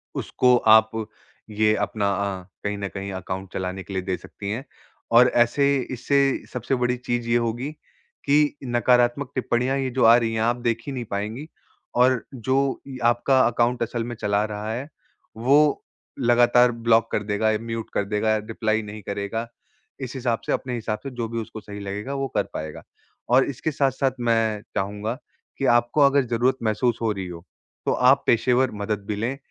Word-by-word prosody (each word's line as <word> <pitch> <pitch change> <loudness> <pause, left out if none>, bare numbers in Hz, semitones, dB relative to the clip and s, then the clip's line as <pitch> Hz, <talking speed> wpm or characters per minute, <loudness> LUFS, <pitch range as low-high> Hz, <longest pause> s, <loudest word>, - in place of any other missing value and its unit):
उसको 125 -1 +2 0.2
आप 110 0 +1 0.6
ये 105 0 +2
अपना 100 -2 -1
अ, 100 -1 -2 0.2
कहीं 105 0 -2
न 100 -1 -3
कहीं 100 0 -6
अकाउंट 95 +1 -6
चलाने 95 0 -4
के 95 - -9
लिए 95 - -1
दे 95 -1 -2
सकती 100 -1 -8
हैं। 115 +6 -3 0.5
और 125 +2 +7 0.2
ऐसे 140 +4 0 0.3
इससे 140 +3 +1 0.3
सबसे 125 +2 -1
बड़ी 125 0 +1
चीज़ 120 -1 -3
ये 120 - +4
होगी 120 +5 -2 0.5
कि 145 +1 +3
नकारात्मक 120 +2 +2
टिप्पणियाँ 130 +1 0
ये 135 -1 -1
जो - - +3
आ 115 +1 +8
रही 115 -2 0
हैं 110 - -1
आप 120 +2 +2
देख 115 0 0
ही - - -3
नहीं 125 -3 -4
पाएँगी। 110 +9 -4 0.5
और 125 0 +3
जो 130 +3 0
य 130 -2 -7
आपका 120 +3 +3
अकाउंट 120 +1 +1
असल 115 0 -3
में 120 +1 -5
चला 105 -1 0
रहा 105 +1 -5
है 130 +5 -4 0.5
वो 130 +5 +4 0.6
लगातार 120 0 +5
ब्लॉक 115 -1 +2
कर 105 - 0
देगा 105 +1 +1
या 110 - +1
म्यूट 115 -1 -5
कर 100 - 0
देगा, 105 +2 +1
रिप्लाई 110 0 -1
नहीं 105 +1 -8
करेगा। 100 +4 -3 0.5
इस 130 -2 -5
हिसाब 120 -3 -1
से - - -2
अपने 125 -1 -3
हिसाब 110 -2 -3
से 135 - -4
जो 120 -2 -2
भी 115 0 -3
उसको 110 0 -8
सही 105 0 -9
लगेगा 100 +6 -5
वो 135 0 -1
कर - - +3
पाएगा। 80 -1 -6 0.5
और 130 +2 +5
इसके 140 +4 -3
साथ-साथ 135 -1 +1
मैं 115 -3 +1
चाहूँगा 105 +3 -2 0.4
कि 135 - -1
आपको 120 +5 +2
अगर 140 -1 +5
ज़रूरत 120 +3 +1
महसूस 110 +2 +1
हो 115 -2 +1
रही 95 -2 -4
हो, 85 -1 -9 0.4
तो - - +2
आप 130 +2 +4
पेशेवर 125 +2 +3
मदद 100 -1 -2
भी 105 - -2
लें 120 +6 -2
115 Hz, 185 wpm, -24 LUFS, 105-125 Hz, 0.6 s, आ